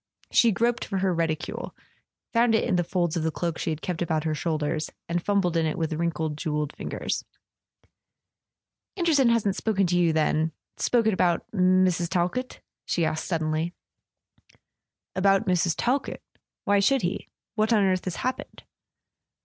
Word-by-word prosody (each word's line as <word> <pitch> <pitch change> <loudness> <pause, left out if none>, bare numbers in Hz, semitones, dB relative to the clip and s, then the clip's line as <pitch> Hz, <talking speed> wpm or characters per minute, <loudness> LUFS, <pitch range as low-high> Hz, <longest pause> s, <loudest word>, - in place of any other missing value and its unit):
She 235 - +5
groped 235 +3 +1
for 195 - -3
her 190 -1 +1
reticule, 165 -2 -3 0.6
found 230 -1 +4
it - - +2
in 185 - +1
the 175 - +2
folds 175 -1 -1
of 170 - 0
the 160 - +1
cloak 165 +1 -3
she - - -2
had 155 -1 -4
kept 175 -2 -3
about 160 -3 0
her 160 -1 0
shoulders, 155 0 -1 0.2
and 170 0 -1
fum¬ 200 -1 +2
bled 175 -2 -1
in 165 -1 +2
it 155 - -2
with 160 -2 -1
wrinkled 160 -2 -2
jewelled 150 -2 -2
fingers. - - -3 1.7
"Anderson 310 -8 +3
hasn't 210 -4 +2
spoken 200 -3 +1
to 175 0 0
you, 170 -2 +4
then—spoken 160 +8 0
about 175 -2 +1
Mrs. 185 -3 +3
Talkett?" 185 +9 -1 0.2
she 170 - 0
asked 155 0 -2
suddenly. 160 0 -1 1.4
"About 195 +1 +3
Mrs. 175 -2 +2
Talkett? 265 +3 -1 0.4
Why 205 0 +3
should 265 +6 +3
he? 175 - -3 0.3
Wliat 215 +1 +1
on 215 -3 +4
earth 185 -1 +1
has 185 -3 -3
happened 255 +1 -4
175 Hz, 155 wpm, -26 LUFS, 160-200 Hz, 1.7 s, She